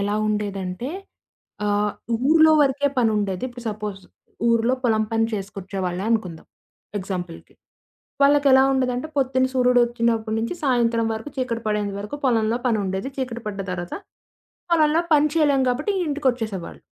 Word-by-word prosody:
ఎలా 205 +1 0
ఉండేదంటే 200 +3 -3 0.8
ఆహ్, 205 0 +1 0.4
ఊరిలో 315 0 +6
వరకే 285 0 +2
పనుండేది. 210 -4 +1
ఇప్పుడు 245 -1 -11
సపోజ్ 210 -2 -5 0.5
ఊరిలో 230 +2 +3
పొలం 220 -2 +3
పని 225 0 +2
చేసుకొచ్చే 195 -1 -5
వాళ్ళే 180 +2 -2
అనుకుందాం 185 -8 -2 0.5
ఎగ్జాంపుల్‌కి. 180 -3 -6 0.7
వాళ్ళకేలా 280 -2 +6
ఉండేదంటే, 255 +1 0
పొద్దున 260 -1 +2
సూర్యుడోచ్చినప్పటి 235 -3 +2
నుంచి 230 +10 -2
సాయంత్రం 235 -4 +2
వరకు 225 +7 -6
చీకటి 235 -3 -2
పడేంత 210 -1 -1
వరకు 210 +8 -6
పొలంలో 230 -2 +2
పని 230 -3 +2
ఉండేది, 190 +7 -3
చీకటి 250 -3 -4
పడ్డ 200 -1 -4
తర్వాత 175 -1 -4 0.8
పొలంలో 315 0 +4
పని 300 0 +5
చేయలేం 290 -4 +3
గాబట్టి 295 +11 0
ఇంటికొచ్చేసేవాళ్ళు. 245 - -2
230 Hz, 125 wpm, -23 LUFS, 205-260 Hz, 0.8 s, ఊరిలో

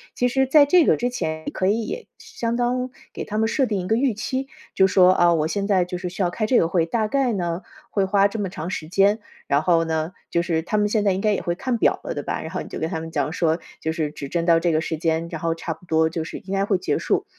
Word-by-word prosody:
其 250 - +2
实 265 +2 +2
在 285 +2 +6
这 340 +3 +5
个 - - +4
之 245 +1 0
前， 160 -10 -3
你 - - -2
可 185 - -2
以 230 - -1
相 230 0 -3
当 250 +1 -1 0.2
给 - - -5
他 210 - -4
们 220 - +2
设 270 +4 +1
定 210 -5 -1
一 180 - -5
个 220 - +2
预 255 -1 +2
期。 260 +5 -3 0.3
就 190 - +5
说： 185 -1 +5
“啊， 175 -1 +4
我 155 -2 +1
现 200 +4 -2
在 185 -3 +3
就 180 0 -5
是 180 +1 -5
需 190 - -6
要 180 - +2
开 215 +5 -2
这 245 +3 +4
个 165 - +2
会， 170 -2 +1
大 215 +5 0
概 265 0 +1
呢， 175 -2 -2 0.3
会 200 -2 +1
花 200 +1 +4
这 215 - -6
么 205 -2 -1
长 175 -2 -6
时 160 -4 -4
间。” 195 +5 +3 0.3
然 145 +2 +2
后 165 -2 +3
呢， 160 +1 -1 0.2
就 170 - +1
是 165 -2 0
他 210 +6 -2
们 210 - +2
现 210 0 +1
在 200 - +3
也 - - 0
应 190 - -3
该 215 0 +2
也 - - -1
会 175 - -2
看 245 +5 -1
表 - - +2
了， - - -4
对 - - -4
吧， - - -3
然 - - -7
后 - - -3
你 - - -8
就 - - -6
跟 160 - -1
他 160 - -2
们 165 0 -6
讲 150 -1 -1
说： 165 -1 +1 0.2
“就 160 - -1
是 160 -2 -2
指 140 -2 -7
针 170 +1 -1
到 165 -1 +5
这 170 0 +1
个 155 0 +1
时 160 - -3
间， 165 +1 0
然 - - -5
后 165 -1 0
差 165 0 -4
不 - - -22
多 160 -1 +3
就 165 0 -3
是 160 - -7
应 190 - -7
该 195 0 +1
会 200 -2 +2
结 185 - -1
束。” - - 0
185 Hz, 325 characters per minute, -23 LUFS, 165-220 Hz, 0.3 s, 在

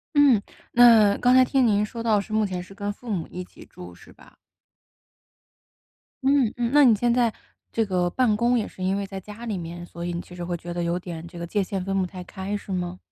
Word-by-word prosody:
嗯， 275 -8 +5 0.3
那 225 -4 +7
刚 250 0 +3
才 255 0 +7
听 260 -1 +2
您 210 -2 +3
说 230 +1 -7
到 215 -3 +2
是 215 - -9
目 215 -1 +2
前 185 -2 -4
是 190 +2 -13
跟 205 0 -3
父 240 +2 -12
母 180 -6 -2
一 180 - -7
起 - - -15
住 90 0 -12
是 - - -17
吧？ - - -20 1.9
嗯 270 -5 +3
嗯， 240 0 -1
那 290 -2 +7
你 230 -3 +6
现 235 +3 +1
在 240 -3 +2 0.4
这 225 -1 0
个 180 -2 0
办 220 -1 +1
公 240 +1 +2
也 220 - 0
是 185 - -12
因 190 +1 +1
为 200 0 -2
在 195 0 -7
家 210 +5 -10
里 210 -4 -3
面， 175 +1 -7
所 170 0 -8
以 175 - -3
你 170 - -3
其 - - -14
实 175 -1 -6
会 175 0 -2
觉 175 +1 -7
得 175 - -3
有 170 +1 0
点 170 -2 -7
这 175 - -12
个 170 - -4
界 205 +4 -1
限 190 -1 -3
分 195 +1 -1
不 185 - 0
太 180 0 -9
开 190 +2 -5
是 205 -1 -7
吗？ 180 -1 -3
200 Hz, 265 characters per minute, -24 LUFS, 180-230 Hz, 1.9 s, 那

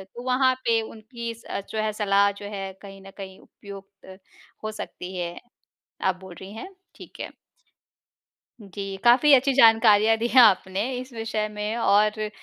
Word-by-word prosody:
तो 240 - -8
वहाँ 260 0 +3
पे 230 -1 +2
उनकी 230 +1 -8
स 225 - -18
अ, - - -3
जो 220 - -6
है 215 - -1
सलाह 200 -1 +2
जो - - -7
है 195 0 -5
कहीं 195 -1 -12
न - - -11
कहीं 190 -1 -9
उपयुक्त 195 -1 -14 0.5
हो 215 - -3
सकती 185 +1 -8
है। 175 -1 -5 0.6
आप 190 -1 +1
बोल 185 -2 -11
रही 195 +2 -10
हैं, 375 +13 -9 0.2
ठीक - - -14
है। - - -5 1.3
जी। 195 0 -7
काफ़ी 255 +5 +5
अच्छी 270 +1 +4
जानकारियाँ 225 -3 +5
दी 235 +2 -1
हैं 255 0 +6
आपने 200 +2 +2
इस 255 +1 -9
विषय 220 -1 -3
में 210 +2 -3
और 215 0 +2
215 Hz, 170 wpm, -24 LUFS, 195-230 Hz, 1.3 s, हैं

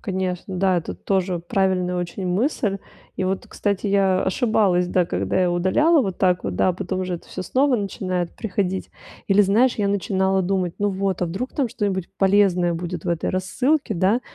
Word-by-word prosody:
Конечно, 185 -2 -3
да, 190 -1 +3
это 165 - -6
тоже 190 -2 -1
правильная 180 0 0
очень 180 +2 -4
мысль. 200 - 0 0.4
И 185 - -1
вот, 190 +1 -2
кстати, 200 0 -2
я 195 -2 +2
ошибалась, 195 -4 +2
да, 180 -1 +1
когда 95 - -1
я 180 -1 +2
удаляла 265 - +3
вот 190 -5 -4
так 180 -2 +2
вот, 95 -2 -3
да, 185 - +3
потом 185 +1 -4
уже 185 -1 -2
это 170 - -9
всё 185 - -5
снова 260 +7 +2
начинает 185 -4 -2
приходить. 190 -3 -2 0.4
Или 200 +1 +5
знаешь, 220 +6 +3
я 205 -2 0
начинала 190 -1 +1
думать: 185 -2 -1
"Ну 205 - +1
вот, 190 -1 -1
а - - +1
вдруг 195 +10 -4
там 270 -5 0
что-нибудь 200 -7 -2
полезное 190 -3 +3
будет 170 0 -5
в - - -3
этой 170 -1 -1
рассылке, 245 +8 0
да, 195 +7 +2
190 Hz, 185 wpm, -22 LUFS, 180-200 Hz, 0.4 s, Или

